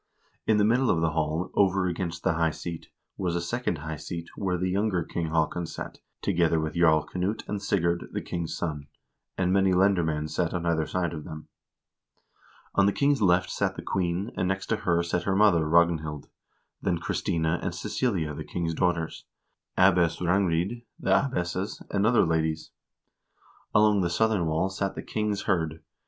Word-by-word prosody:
In 110 - +4
the 105 - +4
middle 125 +4 +3
of 80 - +3
the 80 -1 +1
hall, 80 +2 -1
over 95 -1 +3
against 85 -1 -3
the - - +2
high 80 0 +2
seat, 85 +1 -7 0.3
was 90 -3 -1
a - - +1
second 90 +1 -2
high 75 +1 -5
seat, 85 +2 -6
where 90 -3 -1
the 90 +1 -1
younger 100 -3 +1
King 85 +1 -3
Haakon 80 +2 0
sat, - - -7 0.2
together 85 -3 +2
with 80 0 -2
Jarl 80 -3 +4
Knut 95 +5 -2
and 105 -1 -3
Sigurd, 85 -4 0
the - - -2
king's 85 -2 -4
son; 75 -4 -4 0.5
and 95 -1 +1
many 95 -1 +3
lendermcend 85 -5 +2
sat 85 0 -1
on 85 -1 -2
either 80 -2 +1
side 90 -2 -1
of 75 -2 -6
them. 75 0 -9 1.2
On 100 0 +4
the - - +4
king's 140 -2 +2
left 90 -1 +3
sat - - -1
the - - -7
queen, 90 +2 -1
and 95 - 0
next 95 +1 -1
to - - +2
her 85 -1 +1
sat 85 0 -2
her 95 - +1
mother, 90 -7 +4
Ragnhild, 80 -3 +2 0.6
then 90 -3 0
Christina 80 0 -1
and - - -3
Cecilia, 90 -12 -1
the - - -6
king's 85 -1 -3
daughters, 85 -1 -1 0.5
Abbess 90 -3 +4
Rangrid, 90 +4 +1 0.2
the 95 - -1
abbesses, 95 -4 0
and 100 +1 +2
other 120 -4 +4
ladies. 80 -1 -1 1.0
Along 105 -1 +5
the 85 - +1
southern 105 -1 +1
wall 80 +4 +1
sat 95 0 -2
the - - -5
king's 105 -2 -2
hird. 80 -5 -1
85 Hz, 175 wpm, -27 LUFS, 80-95 Hz, 1.2 s, Along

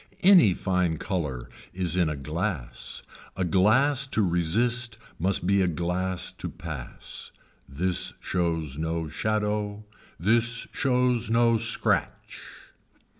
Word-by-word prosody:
Any 175 - +7
fine 90 -3 0
color 75 - -3 0.3
is 90 -2 +1
in 90 -3 +2
a 75 - -3
glass. 75 - -4 0.3
A 95 - 0
glass 130 - +3
to 110 -5 0
resist 110 +8 +1 0.2
must 95 +1 0
be 100 +1 +3
a 95 - +2
glass 90 +2 -2
to - - -4
pass. 80 -8 -7 0.4
This 90 +6 -1
shows 80 -5 -2
no 80 0 -2
shadow. 105 +4 -2 0.3
This 115 +6 +2
shows 125 -3 +1
no 115 0 +4
scratch. 115 +1 0
95 Hz, 115 wpm, -26 LUFS, 85-115 Hz, 0.4 s, Any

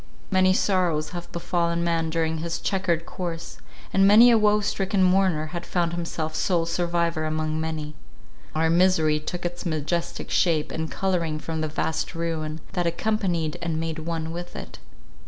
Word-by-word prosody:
Many 185 -1 +4
sorrows 180 -5 +1
have 175 -1 -7
befallen 170 0 0
man 165 -1 0
during 160 0 0
his 165 +1 -2
chequered 175 -4 0
course; 170 -2 -6 0.3
and 195 0 +5
many 225 +4 +8
a 230 - +6
woe 210 0 +4
stricken 195 -1 0
mourner 185 -4 +3
has 175 - -3
found 170 -2 0
himself 165 -2 -3
sole 165 +1 +1
survivor 170 -1 0
among 155 0 -1
many. 155 -2 -4 0.6
Our 160 +1 +2
misery 165 -3 +3
took 175 +3 -5
its 175 0 -4
majestic 170 +1 -2
shape 160 -4 +2
and 160 0 -3
colouring 170 -5 -1
from 160 +1 -4
the 155 - 0
vast 160 +2 -2
ruin, 160 -2 -3
that 175 -1 0
accompanied 175 -3 -1
and 165 -2 -1
made 160 0 -3
one 160 0 -3
with 175 +1 -7
it. - - -8
170 Hz, 160 wpm, -25 LUFS, 160-180 Hz, 0.6 s, many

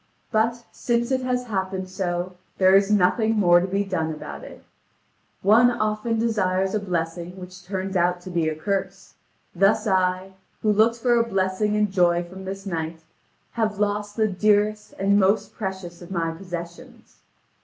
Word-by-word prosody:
But 235 +2 +1
since 235 +1 -1
it 260 0 +1
has 250 -1 -1
happened 190 -3 -3
so, 180 -1 -3 0.2
there 190 0 +5
is 195 0 +4
nothing 215 +3 +2
more 175 -3 +6
to 180 - -2
be 195 +2 0
done 175 -5 -2
about 70 - -8
it. - - -12 0.8
One 225 +5 +6
often 215 -1 -1
desires 195 -4 0
a 215 - +1
blessing 175 -1 -4
which 180 0 -11
turns 190 +1 -4
out 180 0 +2
to 185 - -9
be 165 -2 +1
a 155 - -4
curse; 195 +2 -3 0.4
thus 200 +4 +3
I, 185 -1 0 0.3
who 215 - +3
looked 220 +3 +4
for 240 0 +2
a - - +4
blessing 195 0 0
and 210 -2 +1
joy 175 -2 +3
from 190 +2 -10
this 195 +1 -6
knight, 165 -3 -4 0.5
have 215 -3 -1
lost 205 0 -1
the 220 -1 +2
dearest 210 +2 +1
and 200 +1 +3
most 200 +2 +2
precious 190 -4 -6
of 175 - -11
my 165 -3 -1
possessions. 170 -1 -9
195 Hz, 165 wpm, -24 LUFS, 180-215 Hz, 0.8 s, more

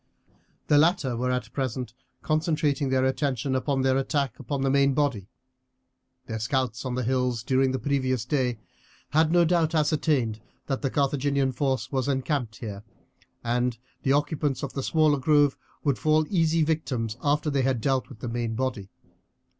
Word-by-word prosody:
The 145 - +4
latter 150 -6 +2
were 125 +2 -1
at 125 -2 -2
present 130 -3 -3 0.3
concentrating 155 -3 0
their 130 0 +2
attention 130 -1 0
upon 130 +1 0
their 130 0 +3
attack 135 -2 -1
upon 140 -2 -3
the 135 - +2
main 140 -1 +3
body. 135 -10 0 1.0
Their 110 - -4
scouts 125 +1 -1
on 125 -1 -2
the 125 - -1
hills 125 -1 0
during 130 +1 +2
the 130 - -1
previous 130 -4 -1
day 125 -4 0 0.5
had 155 +2 +3
no 175 0 +5
doubt 165 -1 +2
ascertained 145 -7 +1 0.2
that 135 -2 -2
the 135 - 0
Carthaginian 140 -1 +1
force 130 -2 -1
was 130 -2 -1
encamped 135 -4 -1
here, 105 -3 -7 0.6
and 120 0 0 0.2
the 135 - +2
occupants 145 -1 0
of 140 - -4
the 135 - -3
smaller 155 0 +2
grove 145 0 +3 0.3
would 140 -7 +1
fall 155 +3 +3
easy 165 -3 +3
victims 130 -8 -1
after 150 +1 +1
they 140 -1 +1
had 130 -2 +1
dealt 130 +3 0
with 120 -6 -13
the - - -4
main 115 -1 -2
body. 120 -6 -3
135 Hz, 165 wpm, -26 LUFS, 125-145 Hz, 1.0 s, no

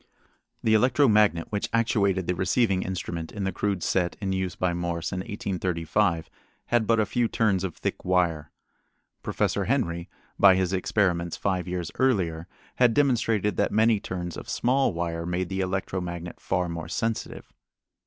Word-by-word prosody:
The 110 - +3
electro 125 +6 +4
magnet 105 -6 +3
which 105 -1 -2
actuated 100 -5 +1
the 90 - 0
receiving 95 +2 +1
instrument 85 -3 -4
in 100 - -5
the 95 - 0
crude 100 -1 -2
set 90 -2 0
in 95 -2 -2
use 95 -1 -2
by 90 -1 0
Morse 85 -1 -3
in 95 - -3
1835 90 -2 -1 0.4
had 120 -3 +1
but 115 -1 +3
a 110 - +3
few 115 +4 0
turns 100 -5 +1
of 95 -4 -3
thick - - -4
wire. 85 -5 +1 0.7
Professor - - -1
Henry, 85 0 -1 0.3
by 95 -2 +7
his 95 0 0
experiments 90 -3 0
five 95 -2 -1
years 90 -2 -3
earlier, 90 -10 +1 0.3
had 120 -2 +4
demonstrated 115 -8 +2
that - - +1
many 110 0 +3
turns 90 -3 -5
of - - -9
small 135 +3 +2
wire 85 -1 -3
made 90 0 -2
the 95 - -3
electro 95 0 -2
magnet 85 -1 -6
far 90 -1 -1
more 85 -1 -5
sensitive. 115 -1 -3
95 Hz, 165 wpm, -26 LUFS, 85-105 Hz, 0.7 s, by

